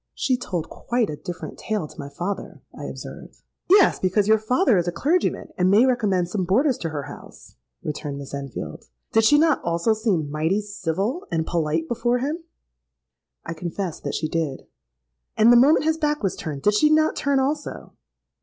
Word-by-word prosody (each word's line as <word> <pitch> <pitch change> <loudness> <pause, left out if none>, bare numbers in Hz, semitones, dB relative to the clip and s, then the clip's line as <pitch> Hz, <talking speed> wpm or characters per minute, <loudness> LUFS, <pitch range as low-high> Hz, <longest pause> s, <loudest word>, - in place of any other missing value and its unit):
'—'She 265 -5 +1
told 185 -10 -4
quite 240 -5 -1
a - - -4
different 165 +4 -7
tale 210 -8 -2
to - - -16
my 140 - -6
father,' 180 +7 -5
I - - -7
observed.—'Yes, 385 +1 0
because 195 +2 +1
your 220 0 +5
father 240 - +3
is 175 - -2
a - - +1
clergyman, 310 - 0
and 180 +1 +4
may 210 +6 +6
recommend 210 -9 +1
some 190 +1 -2
boarders 250 - +2
to 165 - -3
her 150 -2 -4
house,' 145 - -12 0.3
returned 145 -1 -4
Miss 140 -1 -9
Enfield. 140 -2 -6 0.3
'Did 225 0 +4
she 295 +6 +6
not 315 -1 +3
also 170 +6 +1
seem 195 -10 -1
mighty 160 +6 +1
civil 205 - -3
and 160 -1 0
polite 160 -1 -1
before 240 +3 0
him?'—I 65 - -9
confessed 170 +1 -5
that - - -3
she 155 - -1
did.—'And 65 - -1
the - - +7
moment 280 +6 +5
his 320 0 +1
back 300 -4 0
was 195 - 0
turned, 145 -3 -6
did 210 - +4
she 300 +9 +4
not 310 0 +3
turn 280 -1 +1
also?' 290 +3 -3
195 Hz, 175 wpm, -23 LUFS, 155-250 Hz, 0.3 s, the